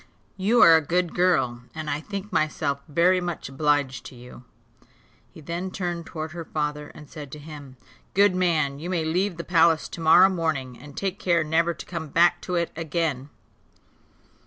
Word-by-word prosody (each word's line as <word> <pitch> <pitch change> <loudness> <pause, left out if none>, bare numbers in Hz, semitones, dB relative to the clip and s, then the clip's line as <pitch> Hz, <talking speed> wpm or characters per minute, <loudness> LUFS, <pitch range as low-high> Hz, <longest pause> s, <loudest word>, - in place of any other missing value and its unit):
"You 205 +5 +4
are 165 - +8
a 160 - +4
good 175 +3 -1
girl, 150 -10 +1
and 155 -1 -5
I 145 +1 -2
think 200 +2 -7
myself 145 -2 0
very 175 +4 +3
much 175 -6 -5
obliged 145 -1 0
to - - -13
you." 125 +1 -13 0.9
He - - -14
then 170 +5 -4
turned 175 -3 -4
towards 155 0 -6
her 170 -1 -6
father, 150 -1 -3
and 150 - -12
said 145 -3 -10
to - - -7
him, 145 -3 -11 0.4
"Good 200 0 +5
man, 160 -6 0
you 170 +4 -6
may 170 -3 -1
leave 180 +3 0
the 170 - -5
palace 165 -2 +3
to 170 - -8
morrow 175 +4 +7
morning, 155 -8 -2
and 140 +3 -14
take 195 -1 -3
care 170 -3 +2
never 165 +2 +1
to - - -9
come 165 -3 -5
back 170 +4 +3
to 180 - -4
it 170 -1 0
again. 155 -4 -2
160 Hz, 180 wpm, -25 LUFS, 150-175 Hz, 0.9 s, are